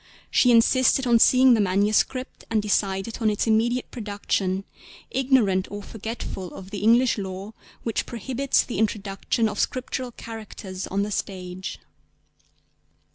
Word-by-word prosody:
She 250 - +4
insisted 255 +3 +4
on 235 -2 +4
seeing 255 +2 +6
the 225 - +3
manuscript, 205 +6 0
and 225 - +2
decided 200 0 -1
on 220 - +3
its 210 - 0
immediate 235 +3 +1
production, 200 -3 -2 0.5
ignorant 240 -9 +2
or 205 0 -7
forgetful 220 -4 -6
of 190 0 -10
the 205 - -4
English 230 +3 +4
law 195 +2 -6 0.3
which 230 - -2
prohibits 260 +4 0
the 245 - -5
introduction 210 +1 0
of 210 -1 -4
Scriptural 255 0 -2
characters 215 -5 -8
on 200 +1 -1
the 210 - -4
stage. 185 -2 -5
215 Hz, 130 wpm, -24 LUFS, 195-240 Hz, 0.5 s, seeing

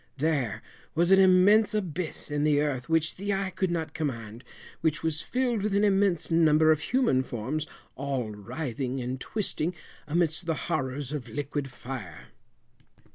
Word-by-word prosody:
There 135 -8 0 0.3
was 170 +3 +2
an 190 - +7
immense 195 +4 +5
abyss 180 -6 -2
in 145 0 0
the 150 -1 +3
earth 140 -4 -1
which 160 -1 +1
the 200 +1 -1
eye 195 -1 -2
could 190 0 -1
not 160 -3 -2
command, 115 -6 -4 0.4
which 155 -2 0
was 160 -1 0
filled 245 -4 0
with 205 0 0
an 200 - +3
immense 195 -5 +2
number 160 -1 +5
of 155 - +3
human 245 - +2
forms, 130 +5 -3 0.3
all 135 -5 -2
writhing 125 +4 -4
and 125 +1 -4
twisting 180 -5 -2 0.3
amidst 165 +2 0
the 160 - +1 0.2
horrors 130 +1 -2
of 135 -6 -5
liquid 145 +2 -3
fire. 120 - -8
155 Hz, 155 wpm, -28 LUFS, 130-180 Hz, 0.4 s, an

